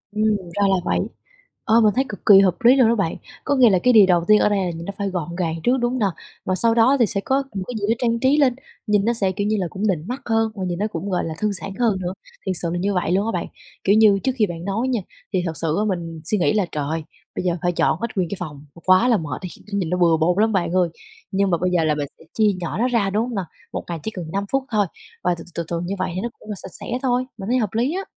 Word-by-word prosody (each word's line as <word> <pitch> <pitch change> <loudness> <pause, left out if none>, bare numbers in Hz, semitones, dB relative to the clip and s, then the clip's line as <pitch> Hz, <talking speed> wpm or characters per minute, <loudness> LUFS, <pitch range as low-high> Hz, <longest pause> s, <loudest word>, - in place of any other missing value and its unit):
Ừm, 215 +1 +1 0.3
ra 205 - 0
là 195 - +4
vậy. - - +1 0.7
Ờ, 225 +2 +5
mình 210 -2 +4
thấy 265 - +2
cực 205 - -6
kỳ 200 -2 +9
hợp 190 -3 +4
lý 245 +3 +7
luôn 255 -4 +5
đó 235 - +3
bạn. 195 -7 -1 0.3
Có 285 - +1
nghĩa 255 -3 +6
là 190 -3 +3
cái 250 - +5
điều 215 -3 +8
đầu 175 -2 +3
tiên 215 0 +6
ở - - +3
đây 205 -1 +1
là 175 - -1
nhìn 165 0 -7
nó 200 - -5
phải 200 -1 -1
gọn 175 -2 -4
gàng 170 -3 -1
trước, 250 +2 +3
đúng 240 0 0
hông 255 - -2
nà? 210 - +3 0.4
Mà 185 - 0
sau 230 +4 +2
đó 240 +4 +5
thì 235 - +5
sẽ 205 -2 -2
có 270 +5 +1
một 190 - -2
cái 245 - -5
gì 200 - 0
đó 225 - +3
trang 235 -1 +1
trí 265 +4 +3
lên, 270 -5 +3 0.3
nhìn 205 -1 +2
nó 235 - +2
sẽ, 195 -5 0
kiểu 205 +2 -2
như 215 0 +1
là, 180 - -1
cũng 195 +4 -6
nịnh 175 -4 -1
mắt 255 +4 -4
hơn 225 -1 +1
và 195 - -4
nhìn 175 0 -3
nó 210 - +1
cũng, 200 -2 -5
gọi 180 - 0
là, 160 - -4
thư 210 0 +1
giãn 195 0 -5
hơn 225 -5 +2
nữa. 180 0 -3 0.3
Thiệt 190 -1 -1
sự 170 - -1
là 175 - -2
như 200 +3 0
vậy 180 -2 0
luôn 195 +3 +2
á - - 0
bạn. - - -2 0.4
Kiểu 200 - +4
như 210 -3 +6
trước 265 - +2
khi 215 -3 +3
bạn 170 -1 -7
nói 210 +6 -1
nha, 245 -5 0 0.3
thì 185 -2 +1
thật 165 - -2
sự 160 -1 -1
á 210 - +1
mình 165 -3 -4
suy 210 - +1
nghĩ 180 - +2
là, 210 -3 +2
trời 150 - -2
ơi, 160 0 -2 0.3
bây - - -3
giờ 175 -1 +1
phải 175 -1 +1
dọn - - +2
hết 235 - 0
nguyên 180 -4 0
cái 200 - -4
phòng, 150 -5 -7 0.2
quá 185 +6 +5
là 235 -3 +4
mệt 150 -7 -5
đi, 185 - -5 0.2
nhìn 190 -5 -1
nó 180 - 0
bừa 170 -2 +4
bộn 170 +3 +2
lắm 220 0 +2
bạn 185 -3 0
ơi. 180 -2 +3 0.4
Nhưng 195 0 +1
mà 170 - +3
bây 180 +2 0
giờ 175 -2 +2
là 155 -1 +2
mình 145 -1 -3
sẽ - - -17
chia 220 -1 +4
nhỏ 170 -2 -4
nó 240 - +2
ra, 230 -6 +1
đúng 210 +3 +1
hông 245 -2 -5
nà? 195 -2 -2 0.3
1 - - -3
ngày 170 -1 -3
chỉ 220 - -3
cần 180 -5 -6
5 200 +1 -1
phút 270 0 +1
thôi 210 -2 +3 0.4
và 180 -1 +2
từ 165 - -9
từ - - -17
từ 170 - -2
từ 170 -1 -2
như 195 +3 -3
vậy 185 - -1
thì 185 - -2
nó 235 - -2
cũng - - -14
là 210 - -3
sạch - - -9
sẽ 250 +1 -3
thôi, 250 -1 +1
mình 195 0 -6
thấy 250 - +3
hợp 215 -4 0
lý 240 +7 +1
á. 385 - -2
200 Hz, 320 wpm, -22 LUFS, 175-225 Hz, 0.7 s, kỳ